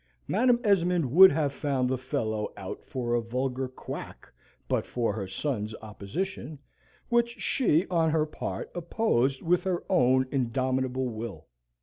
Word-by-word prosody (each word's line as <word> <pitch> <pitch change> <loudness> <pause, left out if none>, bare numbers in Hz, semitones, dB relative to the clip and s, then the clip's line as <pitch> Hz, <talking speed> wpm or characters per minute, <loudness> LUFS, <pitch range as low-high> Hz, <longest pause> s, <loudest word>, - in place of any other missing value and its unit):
Madam 240 +4 +3
Esmond 180 - +2
would 190 +5 +9
have 145 -2 0
found 135 -3 0
the 130 - 0
fellow 115 -5 -2
out 95 -2 -7
for 125 -4 -3
a 120 - +2
vulgar 130 +3 -2
quack 130 - -8 0.4
but - - +1
for 115 -4 -1
her 100 -2 -4
sons' 110 +1 -3
opposition, 135 - -5 0.5
which 235 0 +1
she, 180 - +2
on 165 -3 +2
her 155 -1 +2
part, 155 - -5
opposed 160 - 0
with 175 +1 +2
her 185 -3 -1
own 130 -5 +4
indomitable 130 0 0
will. 110 -2 -6
130 Hz, 140 wpm, -28 LUFS, 120-170 Hz, 0.5 s, would